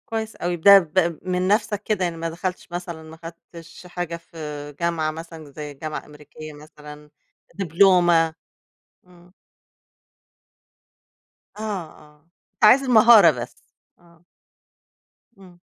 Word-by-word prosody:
كويس 220 -1 -4
أوي، 175 0 -3
ده 200 +4 +7
ب 170 -1 -1
من 185 0 -2
نفْسك 210 0 0
كده 210 -4 -1
يعني 170 -2 -3
ما 165 0 -4
دخلتش 180 +2 -6
مثلًا 175 -2 -7
ما 160 +1 -13
خدتش 165 +1 -12
حاجة 175 -1 -5
في 165 0 -19 0.4
جامعة 170 -2 -1
مثلًا 160 -2 -11
زي 150 0 -8
جامعة 155 +2 -7
أمريكية 150 +1 -12
مثلًا، 150 0 -14 0.5
دبلومة؟ 175 -3 +3 0.7
إمم. 175 0 -21 2.3
آه، - - -8
آه، 155 -7 -8 0.3
أنت - - -11
عايز 250 +6 +7
المهارة 225 -7 +7
بس، 120 -2 -9 0.4
آه. 170 -1 -24 1.1
إمم. 180 -3 -18
170 Hz, 120 wpm, -22 LUFS, 155-185 Hz, 2.3 s, ده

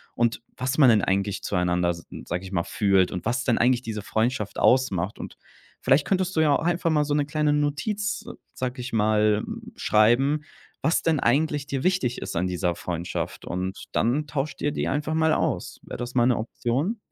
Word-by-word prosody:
und 120 -1 +1 0.2
was 130 +3 -2
man 140 -4 +7
denn 110 -3 +5
eigentlich 100 +1 0
zueinander, 90 -2 +1
s 85 -1 -8 0.2
sage 90 +2 -3
ich 95 - -9
mal 85 -3 +1
fühlt 95 -3 +2
und 90 - -5
was 120 +2 0
denn 120 - +2
eigentlich 125 0 +3
diese 110 -3 -5
Freundschaft 110 +1 -1
ausmacht 105 -7 +2
und - - -7 0.5
vielleicht 140 +2 +3
könntest 185 -1 0
du - - +5
ja 150 -2 +4
auch - - -1
einfach 175 0 +1
mal 150 -1 +3
so 145 - -1
'ne 145 -1 +2
kleine 150 0 +1
Notiz, 180 +9 -1 0.3
sage 130 0 -4
ich 120 - -6
mal, 105 -1 +3
hm, - - -8
schreiben, 125 +8 +3 0.4
was 160 +4 +2
denn 160 -3 +2
eigentlich 145 +3 +1
dir 135 -1 -3
wichtig 180 -10 +1
ist - - -5
an 90 - +1
dieser 90 -1 -1
Freundschaft 85 0 -4
und 95 +2 -4
dann 130 +7 +1
tauscht 145 +1 -3
dir 145 - +1
die - - -2
einfach 150 +3 -1
mal 160 0 +3
aus. - - -1
Wäre - - -7
das 120 +1 -6
mal 120 -1 +4
'ne 125 - +3
Option? 130 - -2
125 Hz, 200 wpm, -25 LUFS, 105-150 Hz, 0.5 s, man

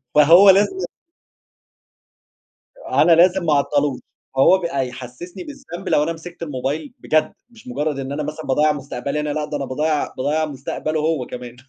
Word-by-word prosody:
فهو 165 +7 +8
لازم 205 - +3 2.0
أنا 175 - +4
لازم 180 +2 +5
ما 155 - +3
اعطّلوش، 145 -1 +1 0.4
هو 160 +8 +6
بقى 140 -7 -2
يحسّسني 130 - -9
بالذنب 270 - -8
لو 150 - +3
أنا 165 - -2
مسكت 170 +1 -10
الموبايل 145 +1 -4
بجد، 155 0 +1 0.2
مش 230 - -18
مجرد 145 +3 -2
إن 135 0 -5
أنا 150 +2 -3
مثلًا 155 +1 -6
باضيّع 150 +3 +3
مستقبلي، 140 0 -4
أنا 150 0 -2
لا 150 +1 -2
ده 150 -1 -4
أنا 140 - -4
باضيّع 150 +3 -1
باضيّع 150 +4 0
مستقبله 155 +2 -4
هو 155 -4 0
كمان. 125 -1 -8
150 Hz, 160 wpm, -20 LUFS, 140-170 Hz, 2.0 s, فهو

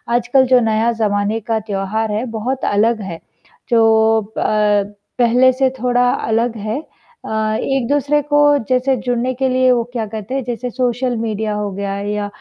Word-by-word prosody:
आजकल 245 +2 +3
जो 255 0 +5
नया 225 0 +1
ज़माने 210 -1 0
का 220 +1 -2
त्योहार 210 +1 -3
है, 215 +4 -2
बहुत 245 +3 -3
अलग 220 +2 +2
है, 170 -4 -6 0.5
जो 220 -2 +3
प 210 -1 +1 0.3
पहले 250 +2 +5
से 265 0 +2
थोड़ा 245 +1 +2 0.2
अलग 230 +1 0
है 215 +4 -3 0.5
अ, 220 0 -1
एक-दूसरे 285 +3 +1
को 290 +1 0 0.3
जैसे 255 +1 +2
जुड़ने 245 +1 0
के 265 +1 -1
लिए 255 0 +3
वो 240 -1 +2
क्या 230 -3 -2
कहते 215 +3 -7
हैं, 270 - -1
जैसे 245 +1 -4
सोशल 250 0 -1
मीडिया 220 -1 -2
हो 210 -1 -2
गया 195 0 -4
या 205 0 -2
225 Hz, 165 wpm, -18 LUFS, 215-250 Hz, 0.5 s, जो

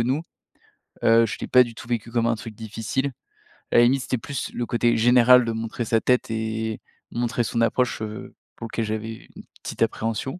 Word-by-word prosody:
nous, 130 +7 0 0.8
heu, 115 0 +5
je 110 - -4
l'ai - - -3
pas 125 - +6
du 120 -2 -9
tout 115 - -10
vécu 115 -1 -2
comme 115 -1 +1
un 115 - +2
truc 110 0 -9
difficile, 115 +5 -3 0.6
à - - +4
la 120 - +8
limite 130 +3 +3
c'était 130 - -1
plus 140 +3 -5
le 120 - -2
côté 120 0 +1
général 125 +1 +6
de 115 - -1
montrer 115 +1 -4
sa 115 +1 +2
tête 125 -2 +1
et 110 0 -3 0.3
montrer 120 0 -1
son 115 0 -1
approche, 120 +1 +1
heu, 110 0 -6 0.2
pour 115 - -7
lequel 115 - -1
j'avais 110 +1 -5
une - - -10 0.2
petite - - -7
appréhension, 115 - -2
115 Hz, 200 wpm, -24 LUFS, 110-120 Hz, 0.8 s, la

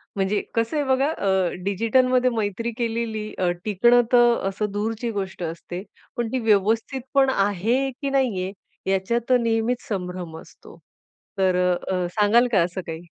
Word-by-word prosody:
म्हणजे 195 +1 0
कसं 230 +6 0
आहे 290 - 0
बघा 265 +2 +2
अ, 190 - +1
डिजिटलमध्ये 250 +5 +2
मैत्री 220 +3 -2
केलेली 225 -2 -2
अ, 180 -1 +1 0.2
टिकणं 240 +4 +4
तर 240 -1 +6
अ, - - 0
असं 210 +1 -3
दूरची 225 +3 -2
गोष्ट 190 -3 -4
असते, 170 +3 -6 0.3
पण 235 -1 0
ती 260 - 0
व्यवस्थितपण 230 +6 +1
आहे 205 +7 +1
की 280 - -1
नाहीये 220 -9 0 0.4
याच्यात 235 +6 0
नेहमीच 230 +1 0
संभ्रम 180 -4 -5
असतो. - - -16 0.6
तर 185 -1 +2 0.2
अ, - - +2 0.2
अ, 180 -1 0
सांगाल 225 +4 +4
का 195 - +4
असं 180 +2 -4
काही? 160 +1 -5
215 Hz, 150 wpm, -23 LUFS, 190-240 Hz, 0.6 s, तर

